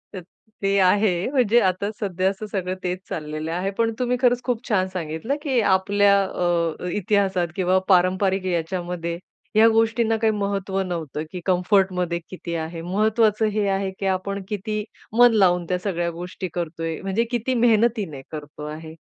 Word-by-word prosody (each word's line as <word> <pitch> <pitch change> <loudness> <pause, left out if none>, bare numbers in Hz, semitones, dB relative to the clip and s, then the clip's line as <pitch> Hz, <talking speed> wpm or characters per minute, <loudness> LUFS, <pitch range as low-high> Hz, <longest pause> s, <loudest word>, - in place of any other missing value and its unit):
अ, 185 - -4 0.4
ते 195 0 +2
आहे 185 +1 +3
म्हणजे 240 -4 +4
आता 190 +2 0
सध्या 190 -2 0
असं 200 +2 -5
सगळं 185 -2 -2
तेच 180 0 -2
चाललेलं 155 0 -4
आहे. 185 +4 -1
पण 225 +2 0
तुम्ही 250 0 +1
खरंच 245 -1 +3
खूप 245 -1 -2
छान 190 -3 +2
सांगितलं, 165 - -3
की 265 -5 +1
आपल्या 200 +1 +3
अ, 175 -2 -1
इतिहासात 195 -3 +1
किंवा 185 0 +2
पारंपारिक 185 +1 +3
याच्यामध्ये 175 -1 -2 0.4
ह्या 220 +1 +7
गोष्टींना 225 0 +2
काही 220 0 +2
महत्व 200 -1 -2
नव्हतं, 165 -5 -4
की 180 -2 -6
कम्फर्टमध्ये 180 -2 +1
किती 170 -2 -6
आहे, 165 +1 -4
महत्वाचं 215 +4 +2
हे 205 -2 +1
आहे, 195 0 -1
की 195 - -3
आपण 195 +1 -1
किती 210 +1 -3 0.3
मन 245 -1 +7
लावून 180 -4 +3
त्या 180 0 0
सगळ्या 175 -3 -1
गोष्टी 180 +2 -6
करतोय, 165 -1 -3
म्हणजे 195 +4 0
किती 240 +2 0
मेहनतीने 225 - +2
करतो 150 -1 -8
आहे. 160 +1 -8
190 Hz, 155 wpm, -23 LUFS, 175-215 Hz, 0.4 s, ह्या